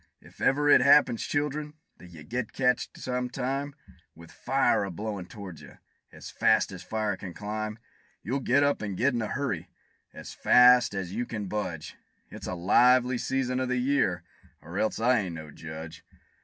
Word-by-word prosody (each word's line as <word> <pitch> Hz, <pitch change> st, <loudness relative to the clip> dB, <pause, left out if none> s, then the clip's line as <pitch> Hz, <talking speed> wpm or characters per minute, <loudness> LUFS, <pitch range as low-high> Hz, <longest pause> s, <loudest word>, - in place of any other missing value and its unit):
If -, -, -18 dB
ever 145 Hz, +2 st, +2 dB
it 145 Hz, -, +7 dB
happens, 140 Hz, -3 st, +5 dB
children, 150 Hz, +1 st, -2 dB, 0.2 s
that 90 Hz, -, -13 dB
you 80 Hz, -3 st, -12 dB
get 120 Hz, +6 st, -4 dB
catched, 125 Hz, -2 st, 0 dB
some 125 Hz, -1 st, -3 dB
time, 135 Hz, +3 st, -3 dB, 0.4 s
With 85 Hz, 0 st, -14 dB
fire 135 Hz, -4 st, +1 dB
a 100 Hz, -, -4 dB
blowin' 100 Hz, 0 st, -5 dB
toward 95 Hz, -6 st, -10 dB
you, -, -, -14 dB, 0.3 s
as -, -, -10 dB
fast 110 Hz, -2 st, +2 dB
as 90 Hz, -2 st, -8 dB
fire 110 Hz, -1 st, -2 dB
can 90 Hz, -3 st, -9 dB
climb, 105 Hz, +1 st, -4 dB, 0.5 s
You'll 125 Hz, +9 st, -2 dB
get 135 Hz, +2 st, +2 dB
up 145 Hz, 0 st, +1 dB
and 100 Hz, -3 st, -4 dB
get 130 Hz, +2 st, +2 dB
in 120 Hz, -, -1 dB
a 110 Hz, -, -2 dB
hurry, 100 Hz, -, -3 dB, 0.4 s
as -, -, -10 dB
fast 125 Hz, -3 st, +5 dB
as 95 Hz, -2 st, -4 dB
you 120 Hz, +3 st, -3 dB
can 105 Hz, -4 st, -5 dB
budge; 95 Hz, -6 st, -5 dB, 0.3 s
It's -, -, -8 dB
a -, -, -3 dB
lively 125 Hz, +7 st, +4 dB
season 130 Hz, -1 st, -1 dB
of 130 Hz, -1 st, -2 dB
the 125 Hz, -, 0 dB
year, 125 Hz, -10 st, +1 dB, 0.4 s
or 85 Hz, +5 st, -6 dB
else 110 Hz, -, 0 dB
I 125 Hz, +1 st, +3 dB
ain't 90 Hz, -5 st, -4 dB
no 80 Hz, -2 st, -9 dB
judge! 80 Hz, +2 st, -9 dB
115 Hz, 185 wpm, -27 LUFS, 95-130 Hz, 0.5 s, it